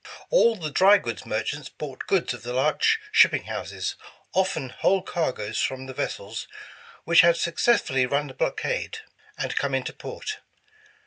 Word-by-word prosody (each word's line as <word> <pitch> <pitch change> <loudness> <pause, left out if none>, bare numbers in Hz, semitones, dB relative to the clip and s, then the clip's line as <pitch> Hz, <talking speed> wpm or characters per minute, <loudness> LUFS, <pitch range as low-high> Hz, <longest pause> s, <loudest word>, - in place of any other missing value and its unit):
All 235 - +5
the 160 -7 -5
dry 195 +7 +6
goods 115 - -6
merchants 125 +6 -3
bought 135 -4 -8
goods 185 -8 +1
of 120 - -9
the 125 0 -5
large 155 - +2
shipping - - +5
houses, - - -4 0.4
often 185 -8 0
whole 190 +9 +1
cargoes 130 - -2
from 130 0 -2
the 130 - -8
vessels 110 -2 -4 0.6
which 165 0 +6
had 170 0 +5
successfully 165 - +2
run 140 +3 0
the 135 - -9
blockade, 460 - -2 0.4
and - - -3
come - - 0
into - - -2
port. 430 0 -6
150 Hz, 150 wpm, -25 LUFS, 130-190 Hz, 0.6 s, dry